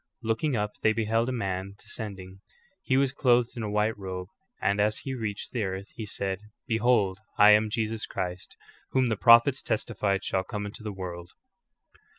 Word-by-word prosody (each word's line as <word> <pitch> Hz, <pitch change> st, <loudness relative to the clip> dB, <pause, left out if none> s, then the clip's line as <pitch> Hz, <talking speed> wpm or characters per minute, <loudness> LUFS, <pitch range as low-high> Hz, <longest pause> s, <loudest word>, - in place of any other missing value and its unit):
"^ -, -, -51 dB, 0.2 s
Looking 115 Hz, +6 st, 0 dB
up 105 Hz, -1 st, -1 dB
they 110 Hz, -, +4 dB
beheld 115 Hz, +2 st, +1 dB
a -, -, -1 dB
man 95 Hz, -4 st, -3 dB
de -, -, -18 dB
scending. 95 Hz, -4 st, -7 dB, 0.4 s
He 130 Hz, -7 st, +1 dB
was 135 Hz, -1 st, +2 dB
clothed 125 Hz, -4 st, +3 dB
in 120 Hz, -, -4 dB
a 110 Hz, -, -3 dB
white 105 Hz, +2 st, +1 dB
robe, 90 Hz, -1 st, -5 dB, 0.3 s
and 100 Hz, +1 st, +1 dB
as 105 Hz, +1 st, +2 dB
he 135 Hz, -, -5 dB
reached 110 Hz, -5 st, -4 dB
the 120 Hz, -, -2 dB
earth 95 Hz, +1 st, -4 dB
he 110 Hz, -2 st, -6 dB
said: 95 Hz, -1 st, -2 dB, 0.3 s
"Behold, 110 Hz, -5 st, +2 dB, 0.2 s
I 105 Hz, 0 st, +8 dB
am 105 Hz, +1 st, +5 dB
Jesus 110 Hz, 0 st, -2 dB
Christ, 95 Hz, 0 st, -5 dB, 0.4 s
whom 130 Hz, -2 st, +3 dB
the 110 Hz, -, +1 dB
prophets 120 Hz, +5 st, +6 dB
testified 100 Hz, -3 st, -1 dB
shall 95 Hz, -1 st, 0 dB
come 105 Hz, +1 st, -5 dB
into 105 Hz, +3 st, -8 dB
the 110 Hz, -1 st, -4 dB
world. 90 Hz, -3 st, -7 dB
105 Hz, 185 wpm, -28 LUFS, 95-115 Hz, 0.4 s, I